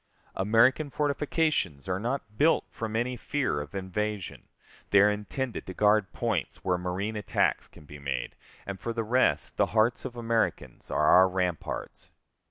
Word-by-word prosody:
American 115 +9 +3
fortifications 145 - 0
are 90 0 -1
not 115 -1 -3
built 155 +8 +3
from 110 -1 -5
any 120 +2 0
fear 130 - -1
of 75 +5 -9
invasion, 100 +1 -4 0.4
they 100 - +6
are 105 +1 +6
intended 110 +4 -4
to 95 - -7
guard 105 -2 +3
points - - -2
where 90 - +2
marine 95 +5 -3
attacks 105 - 0
can 75 - -17
be 75 0 -11
made; 70 -3 -3 0.3
and, 100 -1 -6
for 115 - -3
the 115 0 -2
rest, 125 +4 +1
the - - +3
hearts 115 +3 +3
of 125 -2 -6
Americans 115 - -2
are 75 - +1
our 95 +4 +7
ramparts. 90 -3 -3
105 Hz, 160 wpm, -28 LUFS, 95-120 Hz, 0.4 s, our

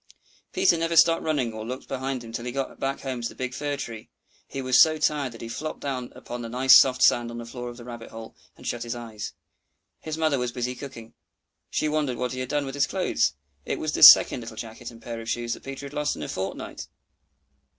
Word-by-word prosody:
Peter 370 - +3
never 165 0 0
stopped 165 +1 +6
running 135 -8 -1
or 110 0 -6
looked 125 +4 -6
behind 130 -1 -3
him 115 - -10
till 115 +1 -4
he 125 - -3
got 135 +1 -4 0.2
home 130 -3 -4
to 115 - -2
the - - -13
big 130 -1 -4
fir 145 +1 -3
tree. 115 -5 -7 0.4
He 135 - -6
was 130 -1 +5
so 155 -1 +5
tired 145 -4 0
that 115 - -11
he - - -5
flopped 155 +7 -5
down 130 -3 -4
upon 120 0 -7
the 115 - -6
nice 130 +2 +7
soft 130 -1 +3
sand 120 -1 +4
on 120 - -7
the 120 - -6
floor 120 +1 -6
of 120 - -10
the 120 - -10
rabbit 120 -2 -8
hole, 110 0 -10 0.2
and - - -14
shut 120 - -3
his 120 0 -4
eyes. 115 -3 -7 0.7
His 155 0 -5
mother 155 -4 +1
was 125 -1 -2
busy 125 +1 -3
cooking; 120 -4 -10 0.6
she - - 0
wondered 150 -5 -1
what 125 -1 -2
he 130 - -5
had 130 -1 -4
done 145 -1 0
with 135 - -6
his 145 0 +1
clothes. 180 - +1 0.3
It - - -3
was - - -2
the - - -3
second - - +10
little 115 -1 -9
jacket 115 +1 -7
and 115 -1 -15
pair 115 -1 -5
of 115 - -7
shoes 120 0 -1
that - - -9
Peter 135 +1 -7
had 140 - -9
lost 150 -1 -1
in - - -6
a - - -4
fortnight! 95 +1 -5
125 Hz, 245 wpm, -26 LUFS, 115-140 Hz, 0.7 s, second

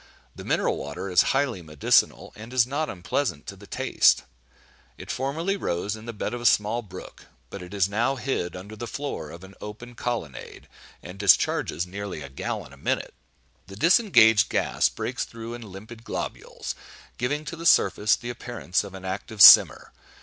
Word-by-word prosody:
The - - -9
mineral - - 0
water 75 +7 -6
is 90 - +6
highly 135 -8 0
medicinal, 75 -3 +1
and 115 +3 -11
is 125 -2 +4
not 145 +5 -3
unpleasant 90 - -3
to - - -8
the - - -15
taste. - - +2 0.7
It - - -7
formerly 160 +9 -2
rose 100 - -2
in 110 0 -12
the - - -3
bed 105 - -4
of 120 - -5
a - - -7
small 105 +3 +2
brook, 105 -5 -12 0.2
but 100 - -7
it 90 0 -10
is 100 -2 +1
now 115 +7 0
hid 125 -9 -3
under 100 +4 -9
the 120 +2 -7
floor 140 - -5
of 85 +3 -11
an 95 +1 -13
open 110 +4 -9
colonnade, 115 - -6 0.4
and 90 +3 -10
discharges 95 -3 +2
nearly 95 -4 -6
a 70 - -9
gallon 65 - -5
a - - -15
minute. - - -2 0.5
The 95 - -11
disengaged 115 - +5
gas - - +1
breaks - - -4
through 115 0 -8
in 120 - -8
limpid 110 +4 -11
globules, - - -6 0.5
giving 145 +5 -2
to 165 - -6
the 165 +1 -2
surface 105 -7 +4
the 120 - -6
appearance 120 -6 -3
of 100 -2 -10
an 95 0 -10
active 100 +3 -6
simmer. - - +8
110 Hz, 180 wpm, -25 LUFS, 95-120 Hz, 0.7 s, simmer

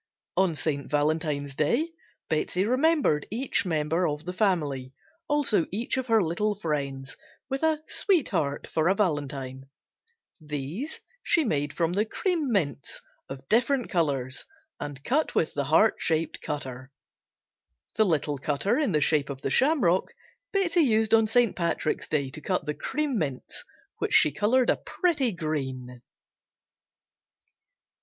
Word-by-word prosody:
On 185 -4 +2
St. 140 -1 -2
Valentine's 150 -1 0
Day 235 - +1 0.4
Betsey 175 +4 0
remembered 255 - +2
each 235 -2 0
member 160 +2 +1
of 150 +1 -4
the 180 - -4
family, 150 -10 0 0.3
also 290 - +2
each 225 +6 -1
of 260 -1 -2
her 225 -3 +4
little 205 +6 0
friends, 140 -7 -3 0.3
with 270 0 -2
a 315 -1 +1
"sweetheart" 200 - +1
for 160 +1 0
a 190 - +3
Valentine. 135 -7 -2 0.7
These 150 - -5 0.2
she 330 - +3
made 145 - -1
from 170 +1 0
the 205 +3 +2
"Cream 330 - -1
Mints" 150 -10 -1 0.3
of 135 0 -8
different 245 +3 +2
colors 140 -7 -1 0.3
and 145 -1 -6
cut 295 - 0
with 160 - +1
the 140 -1 -1
heart 165 +10 +4
shaped 160 0 -1
cutter. 130 -3 -5 1.0
The 220 - +4
little 150 -5 0
cutter 150 - 0
in 280 - +1
the 150 - +2
shape 145 -1 +2
of 135 -1 -7
the 135 - -1
shamrock 255 - +3 0.4
Betsey 375 -4 +2
used 220 -6 +2
on 225 -1 +5
St. 235 -1 +3
Patrick's 170 -3 -1
Day 140 -3 -1
to 155 - -6
cut 185 +5 -1
the 150 - -1
"Cream 280 - -2
Mints," 140 -5 -4 0.4
which - - 0
she 150 - +6
colored 235 - +3
a - - 0
pretty 295 - 0
green. 130 - -4
165 Hz, 140 wpm, -27 LUFS, 145-230 Hz, 1.0 s, she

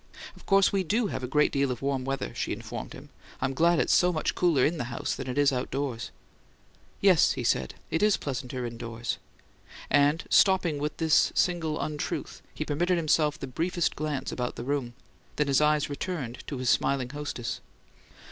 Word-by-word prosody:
"Of - - -18
course 195 -1 +4
we 195 -1 +2
DO 215 +7 +1
have - - -4
a - - -2
great 150 +3 +3
deal 140 -1 +1
of 125 0 -4
warm 135 -2 -1
weather," 135 - -3
she - - -3
informed - - -7
him. - - -12 0.3
"I'm 130 +1 -1
glad 170 +5 +3
it's - - +2
so 180 0 +4
much 155 -3 -1
cooler 165 -8 +3
in 165 +1 0
the 120 - -2
house 120 -1 -3
than 130 -1 -5
it 125 - -4
is 145 -1 +4
outdoors." 130 -1 -3 0.9
"Yes," 190 -5 +5
he - - -4
said. 65 - 0 0.2
"It 160 - 0
is 210 -1 +4
pleasanter 130 -2 -4
indoors." 115 0 -4 0.7
And, 145 +3 +4
stopping 185 -6 +4
with 150 +1 -3
this 160 -2 +3
single 165 -4 +1
untruth, 150 -1 -4
he - - -4
permitted 175 +5 +1
himself 155 -2 +2
the - - -4
briefest 170 +6 -1
glance 150 -3 -3
about 125 -1 -3
the - - -6
room; 130 -3 -2 0.4
then 150 - +1
his 140 0 +3
eyes 150 -1 +3
returned 145 -5 -4
to 140 - -4
his 130 0 -3
smiling 130 -2 +1
hostess. 145 -5 -4
145 Hz, 185 wpm, -28 LUFS, 130-165 Hz, 0.9 s, Yes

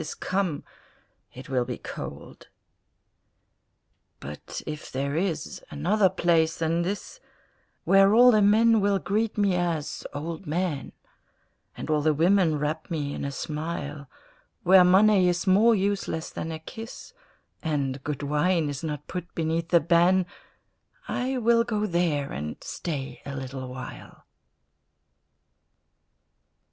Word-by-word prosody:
is 155 - -6
come, 185 -6 -2 0.7
it 130 - -11
will 130 -2 +1
be - - -5
cold. - - -9 1.7
But 75 +2 -8
if 150 0 -7
there 140 +2 -2
is 165 -3 -2
another 190 +7 +2
place 165 -3 +2
than 165 +1 0
this, 200 - -4 0.6
Where 195 +2 +5
all 250 +2 +8
the 215 -2 +4
men 220 +2 +5
will 200 0 +2
greet 215 +3 -1
me 200 -2 +2
as 170 -4 -2
"Old 160 +5 -6
Man," 160 -3 -2 0.9
And - - -6
all 150 -1 +2
the 155 0 +2
women 170 0 +3
wrap 150 +2 -3
me 145 -4 -2
in - - -5
a 140 - -3
smile, 150 -1 -5 0.5
Where 185 +1 +7
money 190 0 +5
is 175 +1 -1
more 210 +5 +5
useless 195 -5 -2
than 165 - -5
a 160 - -4
kiss, 225 - -10 0.5
And 140 -4 -2
good 145 -1 -4
wine 150 +2 +1
is 145 +1 -5
not 150 -3 -4
put 180 -2 -7
beneath 165 0 -1
the 170 - +5
ban, 175 +3 +3 0.8
I 260 +1 -1
will 235 -1 +3
go 215 -3 -1
there 170 -7 0
and 75 +2 -4
stay 140 -6 -5
a 140 - -6
little 130 0 -6
while. 125 0 -10
170 Hz, 130 wpm, -26 LUFS, 150-195 Hz, 1.7 s, all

